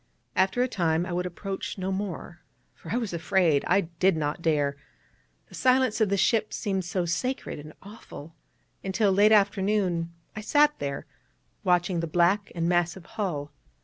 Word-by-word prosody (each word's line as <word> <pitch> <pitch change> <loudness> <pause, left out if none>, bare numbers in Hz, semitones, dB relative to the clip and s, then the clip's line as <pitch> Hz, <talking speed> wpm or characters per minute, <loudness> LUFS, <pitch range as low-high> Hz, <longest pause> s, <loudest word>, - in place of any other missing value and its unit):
After 190 +7 +2
a - - +1
time 170 -7 0
I 180 - -6
would 180 +1 -1
approach 195 +3 -5
no 190 0 -2
more, 190 -3 -5 0.3
for 165 - -11
I 230 - +1
was 225 -7 -3
afraid; 170 -3 +2
I 200 - +4
did 170 +1 +1
not 150 +2 -2
dare, 145 -4 +1 0.7
the - - -19
silence 255 -3 +2
of 215 - +3
the 200 - +1
ship 215 +2 +2
seemed 190 -3 -2
so 180 0 -1
sacred 250 - -2
and 150 +1 -10
awful; 195 -6 -11 0.5
and 190 -1 -4
till 210 -3 +3
late 205 +3 +5
afternoon 195 -4 +2 0.2
I 215 - -5
sat 295 +6 +4
there, 140 -1 -4 0.6
watching 180 -1 +2
the 165 - -2
black 175 +5 +2
and 165 -1 0
massive 175 0 0
hull. 165 -9 -4
185 Hz, 170 wpm, -27 LUFS, 170-205 Hz, 0.7 s, late